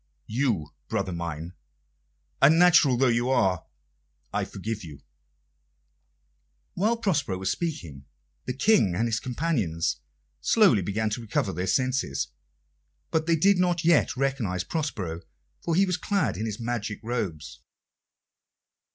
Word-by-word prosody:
You, 110 - -1
brother 95 - -2
mine, 85 0 -5 0.9
unnatural 160 -3 +6
though 135 - +3
you 120 0 +2
are 95 -10 +1 0.7
I - - 0
forgive 110 -1 -5
you." 75 -5 -11 1.7
While 220 +6 +1
Prospero 150 - 0
was 95 0 -1
speaking, 85 - -4 0.4
the 125 - -2
King 140 - +3
and 115 +5 +1
his 115 -1 0
companions 120 - -1 0.4
slowly 200 - +4
began 105 +4 -1
to 115 - -3
recover 100 -3 -1
their 90 +3 -3
senses; 125 - 0 0.8
but 160 0 0
they 165 - +4
did 190 +4 +4
not 175 -2 +1
yet 165 -6 +3
recognise 125 -10 -1
Prospero, 100 - -3 0.4
for 165 - 0
he 195 +3 +4
was 180 -1 -1
clad 200 +1 0
in 110 - -3
his 105 -1 -5
magic 115 -3 -3
robes. 105 -10 -4
120 Hz, 125 wpm, -26 LUFS, -, 1.7 s, unnatural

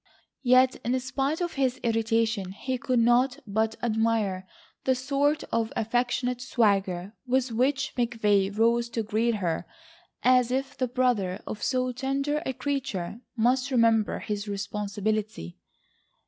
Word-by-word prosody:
Yet, 255 0 +4
in 250 +3 +1
spite 270 +5 -2
of 345 -1 -2
his 260 -2 0
irritation, 225 -4 0
he 255 +5 -3
could 255 +1 0
not 245 +3 +3
but 220 +2 0
admire 220 -5 0 0.4
the 260 - +2
sort 280 +3 0
of 230 -1 0
affectionate 245 +2 0
swagger 200 -6 +1
with 255 0 +1
which 265 +4 0
McVay 215 -5 +2
rose 235 +1 +3
to 225 - +1
greet 220 +2 +1
her, 175 -4 -2 0.6
as 250 -1 +4
if 270 +2 -2
the 255 - -1
brother 235 -7 0
of 210 - -6
so 255 -1 0
tender 275 +4 -1
a 265 - -1
creature 245 -8 -3 0.2
must 250 +3 +2
remember 230 -4 +3
his 210 0 -4
responsibility. 205 - -3
235 Hz, 135 wpm, -27 LUFS, 215-255 Hz, 0.6 s, Yet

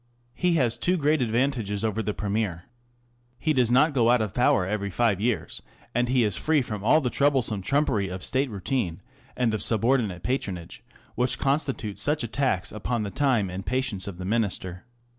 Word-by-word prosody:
He 180 -1 +1
has 125 -7 +2
two 180 +1 +1
great 150 -1 +2
advantages 115 -4 0
over 110 0 0
the 105 - -2
Premier. 100 -4 -2 0.7
He 155 +5 0
does 125 -4 +2
not 145 +5 +4
go 120 -4 +3
out 125 0 +5
of 110 -3 -2
power 120 -6 +3
every 100 +1 -2
five 100 -1 +1
years, 115 0 -2 0.3
and 120 +1 +1
he 125 -1 +3
is 105 -4 +1
free 155 -3 +1
from 105 -4 -6
all 155 +8 +4
the 125 -4 -1
troublesome 130 -8 +1
trumpery 110 -3 +1
of 95 0 -5
State 135 +1 +1
routine 100 -3 -3 0.3
and 120 -3 +1
of 110 - -2
subordinate 110 -5 +1
patronage 95 -9 -3 0.3
which 125 +1 0
constitute 135 -7 -1
such 145 +5 0
a - - -2
tax 120 -5 0
upon 110 +2 -2
the 100 - -4
time 120 -9 +1
and 95 +1 -6
patience 125 -7 -1
of 95 -3 -6
the 90 - -6
Minister. 95 -4 -2
115 Hz, 185 wpm, -26 LUFS, 100-130 Hz, 0.7 s, out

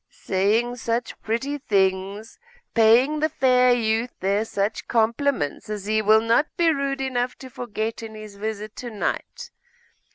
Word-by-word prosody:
'Saying 215 +6 0
such 235 0 -3
pretty 265 +6 -2
things! 195 -1 -1 0.3
paying 240 +7 +4
the 310 +1 +1
fair 250 -2 +4
youth 230 0 +1
there 200 +3 +1
such 205 -1 -2
compliments, 230 - 0
as 210 -2 -4
he 215 +1 +1
will 215 +1 +5
not 230 +6 +2
be 335 -2 +4
rude 275 -1 -2
enough 250 -2 -1
to 260 -1 -11
forget 225 -2 -4
in 220 -1 -8
his 215 -1 -9
visit 215 +1 -5
to 245 - -6
night. 215 -3 -4
225 Hz, 150 wpm, -24 LUFS, 215-250 Hz, 0.3 s, will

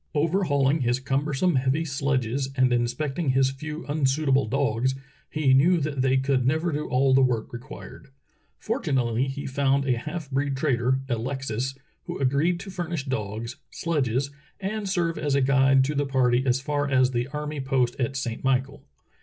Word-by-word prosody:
Overhauling 150 -3 +2
his 120 0 +1
cumbersome, 140 +4 0
heavy 135 +5 +1
sledges 135 -3 -1
and 130 -1 +3
in 120 0 +2
specting 135 +3 -2
his 135 0 +3
few 150 +4 -7
unsuitable 140 -2 +1
dogs, 130 0 0 0.3
he 150 -4 +2
knew 165 +7 +5
that 145 -3 -2
they 130 0 +3
could 130 -1 +1
never 160 +6 +1
do 150 0 -3
all 130 +1 +2
the 135 - +5
work 125 -4 0
required. 130 +5 -10 0.5
Fortunately 125 -1 0
he 140 +1 -5
found 140 0 +1
a 125 -3 +1
half 155 +3 -5
breed 135 0 0
trader, 130 -2 +1
Alexis, 130 +1 -3 0.3
who - - -5
agreed 140 +6 +1
to 195 -1 -8
furnish 170 -5 -4
dogs, 115 -2 -4
sledges, 140 -4 -1 0.3
and 200 +1 -3
serve 170 -3 0
as 145 -2 0
a - - +4
guide 135 0 +4
to 145 +3 -1
the 145 -1 0
party 130 -2 +2
as 125 +1 +3
far 145 +1 -1
as 130 -1 +3
the 120 0 -1
army 150 +1 -5
post 130 -2 +1
at 130 +1 -1
Saint 120 -4 -4
Michael. 135 +1 0
135 Hz, 170 wpm, -25 LUFS, 130-150 Hz, 0.5 s, knew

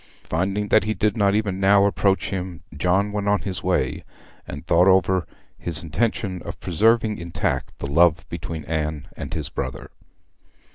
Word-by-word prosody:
Finding 100 +5 -1
that 110 - +4
he 110 0 -1
did 105 +1 +1
not 100 -2 +3
even 100 -3 -1
now 100 +1 +5
approach 100 -1 +1
him, 90 -4 -5
John 95 +6 +1
went 105 -1 -2
on 100 0 +2
his 95 -3 -4
way, - - 0 0.4
and 70 +3 -7
thought 85 +2 +4
over 95 -2 +3 0.3
his 85 -2 -2
intention 95 +1 -1
of - - -7
preserving 110 +4 +2
intact 85 0 -3
the - - -5
love 85 +3 +3
between 80 -2 -6
Anne 75 -2 -3
and - - -7
his - - -4
brother. 65 -2 -5
95 Hz, 160 wpm, -23 LUFS, 85-100 Hz, 0.4 s, now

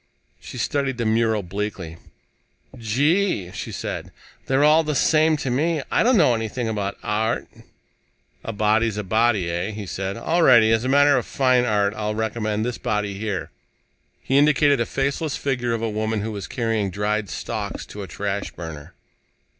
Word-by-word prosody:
She - - -10
studied 140 -3 -1
the 120 - -2
mural 110 -1 +1
bleakly. 90 -3 -5 0.8
"Gee," 130 - +1
she - - -6
said, - - -5 0.4
"they're 135 +2 +2
all 155 +2 +5
the 150 -1 -2
same 155 +2 +3
to 135 -3 -3
me. 155 +3 0
I - - +3
don't 245 +1 +4
know 150 -9 +5
anything 115 +1 -3
about 105 -3 -3
art." 110 +1 -1 1.0
"A - - -4
body's 110 +1 +1
a 105 - -2
body, 110 -2 +2
eh?" 85 +4 -2
he 105 -1 -6
said. 95 +2 -4
"All 165 +9 0
righty. 120 -7 +6
As 115 0 +2
a 130 - -1
master 145 +1 +5
of - - -7
fine 130 -2 +2
art, 105 -3 +1
I 105 -1 -3
recommend 110 0 -2
this 125 -2 -3
body 105 -2 -2
here." 100 -6 -3 0.7
He 135 +1 +3
indicated 145 -1 +4
a 115 - -1
faceless 140 +2 -1
figure 125 -4 -1
of 115 - -4
a - - +1
woman 110 0 -1
who 110 +2 -3
was 100 -5 -6
carrying 115 -3 -1
dried 105 +1 -2
stalks - - -5
to 105 - -9
a 95 - -6
trash 100 +4 -3
burner. 80 -4 -9
110 Hz, 175 wpm, -23 LUFS, 105-135 Hz, 1.0 s, righty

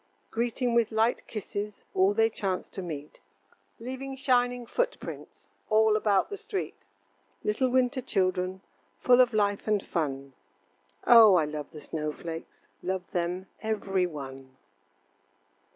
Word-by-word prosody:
Greeting 240 +1 0
with 235 -1 +3
light 225 +2 +1
kisses 210 -1 -5
All 195 +2 +3
they 225 0 +5
chance 195 -4 -3
to 190 - -6
meet, 150 -4 -7 0.6
Leaving 260 +3 -6
shining 245 -2 +1
footprints - - -4 0.2
All 220 0 +4
about 210 - +2
the 405 - -4
street. 415 -1 -4 0.7
Little 235 +5 +1
winter 255 +1 +2
children 185 -3 0 0.4
Full 250 0 +5
of 250 0 +4
life 205 -2 0
and 210 -2 +1
fun 140 -5 -3 0.7
Oh! 225 -5 +9
I 160 -4 +4
love 150 -1 -5
the 150 - -11
snow 150 +1 -3
flakes, 165 +1 -8 0.2
Love 185 0 -3
them 180 +1 -2 0.2
every 195 -4 0
one. 135 -4 -9
205 Hz, 130 wpm, -28 LUFS, 180-240 Hz, 0.7 s, Oh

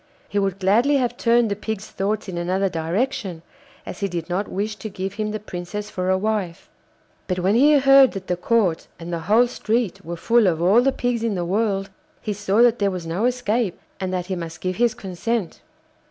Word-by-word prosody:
He 205 - -1
would 195 -1 0
gladly 225 +9 +3
have 245 -2 0
turned 235 -2 +2
the - - 0
Pig's 215 0 -5
thoughts 205 +2 -2
in 185 - -5
another 185 +3 0
direction, 175 +1 -2 0.4
as - - -7
he 200 - 0
did 175 -3 -5
not 195 +3 -1
wish 210 +2 -3
to 215 - -6
give 190 0 -5
him 215 +1 -2
the 215 0 -3
Princess 205 +1 -6
for 185 0 -2
a 190 - +3
wife; 200 -4 -3 0.6
but 185 - -1
when 185 +3 +2
he 290 +6 +6
heard 275 -1 +6
that 195 -1 -6
the 180 - -1
Court 180 -2 +1
and 170 +1 -7
the 170 - -1
whole 230 +4 +6
street 230 -3 -2
were 170 +1 -6
full 230 +3 +3
of 165 -3 +1
all 190 +8 +5
the 270 +2 +3
pigs 245 -3 -1
in 230 -3 0
the 175 -1 -2
world 195 0 0 0.3
he 210 - -3
saw 205 +3 +2
that 240 -1 +4
there 200 -1 +2
was 180 -3 -5
no 175 +7 -1
escape, 240 -5 0 0.2
and 185 -1 -2
that 180 -1 -2
he 185 - -3
must 165 -1 -6
give 185 -1 -3
his 235 0 +2
consent. 195 +1 -3
200 Hz, 215 wpm, -22 LUFS, 180-230 Hz, 0.6 s, he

